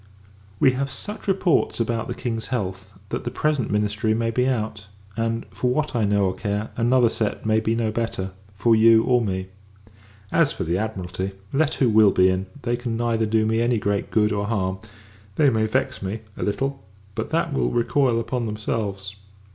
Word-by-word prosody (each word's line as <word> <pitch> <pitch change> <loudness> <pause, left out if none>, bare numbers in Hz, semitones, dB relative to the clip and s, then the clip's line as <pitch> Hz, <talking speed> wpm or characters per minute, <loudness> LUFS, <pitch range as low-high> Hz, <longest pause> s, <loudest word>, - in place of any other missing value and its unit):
We 130 - +6
have 135 +2 -2
such 205 +12 -7
reports 185 -8 +2
about 115 -1 -1
the 120 - -4
King's 115 -4 -3
health, 95 -5 -3 0.2
that - - -3
the - - -2
present 150 -6 0
ministry 105 +1 +1
may 115 0 0
be 125 +2 +1
out; 110 -4 -2 0.3
and, 115 0 -1
for 115 +6 -1
what 150 +2 0
I 115 -3 +2
know 100 0 +2
or 95 - 0
care, 105 +1 -3
another 120 +1 +4
set 110 -2 -2
may 110 0 +3
be 110 +1 0
no 115 -2 0
better, 110 -4 -3 0.2
for 105 +3 +3
you 110 0 +6
or 125 0 +3
me. 95 -2 -3 0.8
As 165 -3 +3
for - - -4
the 85 0 -1
Admiralty, 95 -2 -3 0.2
let 150 +2 +2
who 130 - +2
will 110 -2 +6
be 95 -1 +4
in, 95 +1 -1 0.2
they 120 0 0
can 120 -2 -3
neither 115 -1 +1
do 110 0 +2
me 110 +1 +1
any 120 0 +2
great 100 -1 -1
good 105 -1 +2
or 100 -1 -1
harm: 95 -4 -1 0.6
they 145 -3 +4
may 110 -1 +1
vex 110 - -1
me, 100 +3 -4
a - - -8
little; 135 +6 -2 0.3
but, - - -4
that - - 0
will - - +1
recoil 120 0 +2
upon 120 0 -2
themselves. 105 -2 -3
110 Hz, 195 wpm, -23 LUFS, 100-120 Hz, 0.8 s, We